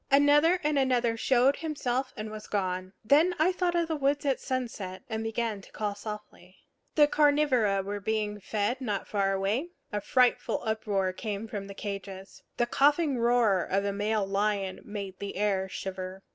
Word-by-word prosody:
Another 290 +5 +5
and 300 -1 +2
another 245 -3 +2
showed 255 +4 +3
himself 265 -5 -2
and 215 0 -5
was 215 0 -8
gone. 185 -2 -2
Then 310 +9 +4
I 320 +4 +3
thought 360 -1 0
of 340 -1 +1
the 320 - -1
woods 285 0 0
at 270 -2 +1
sunset, 230 -8 -4
and 220 0 -2
began 225 -2 -2
to - - -17
call 210 -1 -2
softly. 210 -3 -9 0.4
The 300 - +7
carnivora 285 -10 +3
were 205 +1 -4
being 210 0 -2
fed 215 +6 -1
not 210 -6 -2
far 195 -2 +1
away; 200 - 0 0.3
a 205 - -1
frightful 250 +3 +2
uproar 205 -4 0
came 210 +2 -4
from 200 -2 -5
the 200 - -9
cages. 195 -1 -7 0.2
The 240 - +3
coughing 285 +2 +2
roar 230 -6 +3
of 195 +1 0
a 200 - -1
male 205 0 0
lion 195 -1 -1
made 200 -3 -6
the 200 - -5
air 195 -1 0
shiver. 190 0 -6
215 Hz, 175 wpm, -29 LUFS, 195-265 Hz, 0.4 s, The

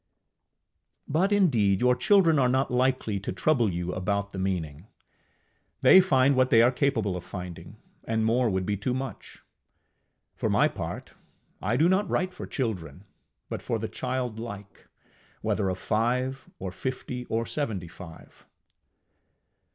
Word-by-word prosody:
But 180 +7 +1
indeed 120 - +3
your 125 0 +4
children 170 -3 +4
are 125 -2 +3
not 130 +1 +1
likely 125 -5 +1
to 100 - -4
trouble 120 +1 +2
you 90 +1 -3
about 100 +2 -2
the 95 - -6
meaning. 90 -3 -3 1.0
They 190 - +9
find 135 -6 +3
what 130 0 +3
they 115 0 +6
are 120 - +5
capable 125 -8 0
of 90 - -6
finding, 90 -3 -8 0.3
and 110 0 0
more 120 +1 +2
would 95 -2 -1
be 105 - 0
too 125 +6 -2
much. 130 -1 -7 0.9
For - - -1
my - - +4
part, - - -6 0.5
I 105 +5 0
do 160 +5 +4
not 190 +3 +2
write 185 0 0
for 180 - -8
children, 95 - -4 0.4
but - - -5
for 115 - -2
the 110 0 -3
childlike, 115 -6 -5 0.6
whether 95 - 0
of 95 - -2
five, 125 +6 -1
or 95 -1 -5
fifty, 125 +3 -5
or 115 0 -1
seventy 110 - -3
five. 85 -1 -13
115 Hz, 145 wpm, -27 LUFS, 95-130 Hz, 1.0 s, They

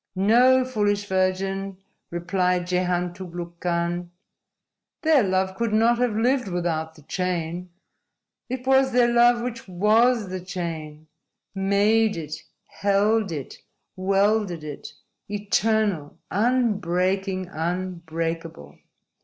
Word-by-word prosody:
_ - - -1
_"No, 255 +5 +5
Foolish 205 -5 0
Virgin," 190 0 -1 0.3
replied 180 +1 0
Jehan 180 -1 0
Tugluk 175 -1 -8
Khan. 175 0 -1 0.9
"Their 315 -4 +5
love 190 -1 0
could 230 0 -1
not 230 +2 +3
have 245 -4 +1
lived 250 +2 +1
without 165 -3 -2
the 155 - -17
chain. 180 +1 -3 0.8
It 255 0 -4
was 265 0 +4
their 245 -1 +5
love 240 0 +5
which 240 -3 -5
WAS 215 +4 +3
the 185 0 -4
chain 160 -4 -6 0.5
made 205 +2 +2
it, 155 -1 -6 0.2
held 205 +1 +1
it, 145 -5 -6 0.4
welded 195 -2 +1
it, 150 -2 -7 0.4
eternal, 205 -5 0
unbreaking, 195 -5 0
unbreakable. 165 - -4
190 Hz, 105 wpm, -24 LUFS, 175-220 Hz, 0.9 s, No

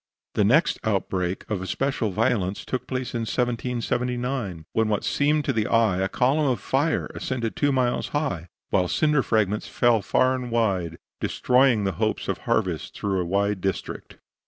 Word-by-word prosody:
The 105 - +2
next 140 - +3
outbreak 95 -3 -1
of 105 -4 -2
especial 125 +3 -1
violence 95 0 0
took 125 -1 -3
place 130 -1 -3
in 120 - -1
1779, 120 - -2
when 110 0 +2
what 105 -2 0
seemed 150 +1 +1
to 135 - +1
the 110 -2 0
eye 115 -5 +3
a 95 0 0
column 140 +6 +2
of 125 -3 +1
fire 145 +5 0
ascended 120 -4 -3
two 145 -1 +2
miles 125 -2 +1
high, 140 - -2 0.2
while 90 -2 +2
cinder 150 - +2
fragments 105 -3 0
fell 120 -3 +3
far 130 +6 +2
and 125 -1 -4
wide, 95 -8 0 0.2
destroying 125 -4 +3
the 95 - +1
hopes - - 0
of - - -2
harvest - - 0
throughout 95 -2 -1
a - - -2
wide 100 +2 0
district. 95 -1 -4
115 Hz, 165 wpm, -25 LUFS, 100-130 Hz, 0.2 s, next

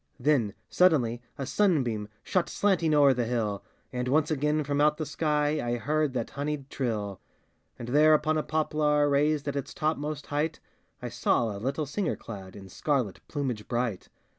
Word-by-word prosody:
Then 125 -7 +2
suddenly 125 -10 +3 0.2
a 135 - -3
sunbeam 130 - +1 0.2
Shot 185 -2 0
slanting 185 -6 +2
o'er 140 -2 +6
the 120 -2 -1
hill, 110 -4 -1 0.3
And 125 0 -2
once 150 +4 +2
again 150 +1 +1
from 145 0 0
out 150 0 +4
the 155 - -3
sky 150 0 0
I 120 0 -1
heard 150 +3 0
that 120 -3 -3
honied 140 -1 -4
trill. 105 -7 -3 0.6
And 120 - -7
there 155 +3 +6
upon 155 +1 +1
a 155 - +1
poplar, 150 -1 +1
Poised 145 +1 +2
at 140 - -2
its 140 - -4
topmost 150 -1 -2
height, 150 +2 -1 0.4
I - - -3
saw 115 -4 +1
a 100 - -7
little 140 +5 -1
singer 165 +6 -1
clad 95 -4 -9
In 100 -2 -10
scarlet 125 - -1
plumage 130 -8 -3
bright. 120 -5 -2
145 Hz, 170 wpm, -28 LUFS, 120-155 Hz, 0.6 s, o'er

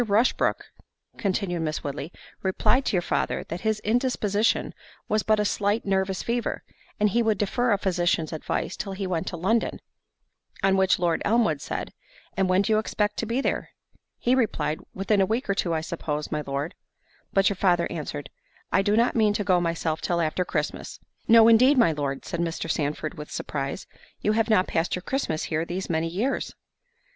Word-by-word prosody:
Rushbrook," 220 +2 +1 0.5
continued 195 -4 -1
Miss 155 -1 -2
Woodley, 145 +3 -5 0.3
"replied 225 +7 +2
to - - 0
your 180 -2 +2
father, - - -1
that 170 +2 -4
his 220 -1 0
indisposition 220 -2 +1 0.3
was 215 0 +2
but 215 0 +2
a 210 - +2
slight 205 +2 0
nervous 190 -1 0
fever, 235 0 -2 0.4
and 210 0 +4
he 235 - +2
would 220 -2 +2
defer 240 +4 +1
a 205 - +4
physician's 175 -4 0
advice 155 - -2
till 195 -2 -5
he 195 0 -4
went 175 -3 -2
to 175 - -4
London"—on 195 -1 -3
which 190 -1 +3
Lord 170 -2 +1
Elmwood 210 -11 +2
said, - - -4 0.4
"And 190 -1 +1
when 185 +2 +4
do 220 - +1
you 215 - +4
expect 210 -1 -1
to 230 - -2
be 240 +4 0
there?"—he 250 -2 -3
replied, 225 -11 0 0.2
"Within 195 +1 +2
a 190 - +3
week 235 +6 -1
or 200 - +2
two, 175 -4 0
I 160 - 0
suppose, 150 -2 -4
my 150 - -1
Lord." 140 +5 -2 0.6
But 195 0 +4
your 200 - -2
father 175 -2 +2
answered, 150 -3 -5 0.4
"I - - +4
do 205 +2 +2
not 235 +2 +3
mean 215 -3 +3
to 205 - -1
go 185 -3 +3
myself 165 -2 -1
till 175 -1 0
after 165 +2 0
Christmas." - - -3 0.3
"No 225 0 +8
indeed, 255 +5 +6
my 230 -9 +5
Lord!" 140 -3 -3
said 170 - -4
Mr. 165 -1 -2
Sandford, 155 +2 -2
with 150 - -7
surprise: 140 +4 -4 0.3
"you 210 - +1
have 225 +1 +1
not 210 -4 +4
passed 165 +1 0
your 180 - -6
Christmas 215 - -1
here 160 0 -1
these 180 +2 -4
many 160 0 0
years." 210 +11 -2
190 Hz, 185 wpm, -26 LUFS, 165-215 Hz, 0.6 s, No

